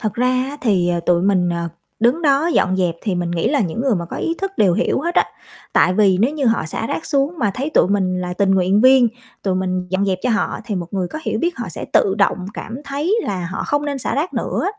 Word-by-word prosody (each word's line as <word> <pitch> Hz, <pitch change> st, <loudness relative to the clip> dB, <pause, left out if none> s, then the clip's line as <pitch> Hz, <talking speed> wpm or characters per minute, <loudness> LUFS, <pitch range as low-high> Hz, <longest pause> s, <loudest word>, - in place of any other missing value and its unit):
Thật 215 Hz, -3 st, -2 dB
ra 250 Hz, +1 st, +1 dB, 0.2 s
á, 290 Hz, -, -7 dB
thì, 190 Hz, -7 st, +2 dB
ờ, 175 Hz, -1 st, 0 dB
tụi 170 Hz, 0 st, +2 dB
mình, 185 Hz, -2 st, +2 dB
ờ, 170 Hz, -1 st, -2 dB, 0.3 s
đứng 245 Hz, +9 st, +2 dB
đó 285 Hz, +1 st, +3 dB
dọn 190 Hz, -, +2 dB
dẹp 180 Hz, -3 st, +1 dB
thì 200 Hz, -5 st, -1 dB
mình 175 Hz, -1 st, -2 dB
nghĩ 170 Hz, -1 st, 0 dB
là 285 Hz, -2 st, +1 dB
những 185 Hz, +1 st, -2 dB
người 260 Hz, -2 st, +2 dB
mà 175 Hz, -3 st, -2 dB
có -, -, -5 dB
ý 330 Hz, -, -1 dB
thức 390 Hz, 0 st, -2 dB
đều 195 Hz, -4 st, +4 dB
hiểu -, -, 0 dB
hết 345 Hz, +4 st, -2 dB
á, -, -, +4 dB, 0.5 s
tại 185 Hz, -, +4 dB
vì 195 Hz, -2 st, +4 dB
nếu 255 Hz, +7 st, +2 dB
như 295 Hz, -3 st, -2 dB
họ 225 Hz, -5 st, +2 dB
xả 190 Hz, +7 st, -4 dB
rác 320 Hz, -, -4 dB
xuống 280 Hz, +2 st, +1 dB
mà 210 Hz, -5 st, +1 dB
thấy 275 Hz, +4 st, -3 dB
tụi 245 Hz, -, +3 dB
mình 185 Hz, -2 st, 0 dB
là 180 Hz, 0 st, -3 dB
tình 195 Hz, +2 st, +1 dB
nguyện 190 Hz, +1 st, +3 dB
viên, 255 Hz, 0 st, +6 dB, 0.3 s
tụi 190 Hz, -2 st, 0 dB
mình 185 Hz, -1 st, -2 dB
dọn 190 Hz, +1 st, +1 dB
dẹp 190 Hz, -2 st, 0 dB
cho 250 Hz, -, +1 dB
họ 225 Hz, -, 0 dB
thì 210 Hz, -, -3 dB
một 175 Hz, -3 st, -3 dB
người 185 Hz, -3 st, -1 dB
có 315 Hz, -, -6 dB
hiểu 220 Hz, -, -2 dB
biết 345 Hz, +7 st, -1 dB
họ 235 Hz, -5 st, -5 dB
sẽ 170 Hz, -, -6 dB
tự 195 Hz, -, +3 dB
động 195 Hz, -2 st, +1 dB
cảm 230 Hz, -, -6 dB
thấy 290 Hz, +9 st, -1 dB
là 185 Hz, -3 st, -3 dB
họ -, -, -3 dB
không 290 Hz, 0 st, 0 dB
nên 285 Hz, -2 st, -2 dB
xả -, -, -2 dB
rác 305 Hz, +6 st, -2 dB
nữa. -, -, -2 dB
205 Hz, 270 wpm, -19 LUFS, 185-275 Hz, 0.5 s, viên